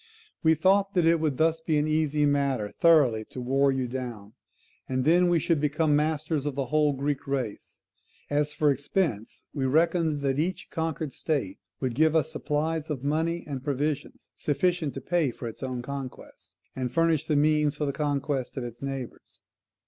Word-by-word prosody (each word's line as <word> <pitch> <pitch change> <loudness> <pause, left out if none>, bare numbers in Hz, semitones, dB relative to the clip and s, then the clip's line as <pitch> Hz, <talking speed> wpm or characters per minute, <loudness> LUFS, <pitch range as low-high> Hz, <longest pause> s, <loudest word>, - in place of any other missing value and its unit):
] - - -27 0.2
We 160 0 +5
thought 195 +3 +2
that 175 -2 +3
it 165 0 +4
would 150 -4 0
thus 160 0 +2
be 160 -1 +1
an 150 +1 +1
easy 155 -1 +1
matter 140 -7 +1
thoroughly 145 -10 +4
to 130 - -9
war 135 +3 +2
you 130 -1 -1
down; 120 -5 -6 0.6
and 130 0 0
then 175 +2 +5
we 175 - +3
should 160 -1 +1
become 150 +1 +1
the 145 - +5
masters 155 -1 -1
of 145 - -3
the 135 -1 -1
whole 150 +2 +2
Greek 140 +1 -2
race. 130 -6 -4 0.4
As 145 +1 0
for 145 0 +2
expense, 140 - -2
we 135 -3 -1
reckoned 160 +1 +2
that 135 0 0
each 180 +4 -2
conquered 160 -3 -3
state 135 - -2 0.2
would 130 -3 -1
give 160 +5 +3
us 160 -1 +2
supplies 155 +1 -2
of 140 -4 -3
money 165 +4 0
and 135 -3 -5
provisions 145 +1 -3
sufficient 155 +1 0
to - - -5
pay 170 -5 +1
for 120 - -7
its 115 - -8
own 130 -2 -4
conquest, 135 -1 -8 0.2
and 125 -2 -3
furnish 165 -2 +2
the 155 - 0
means 150 0 +3
for 150 - -2
the 140 - -1
conquest 140 -2 -2
of 130 - -2
its 120 -1 -8
neighbours. 135 -3 -7
145 Hz, 185 wpm, -27 LUFS, 135-160 Hz, 0.6 s, We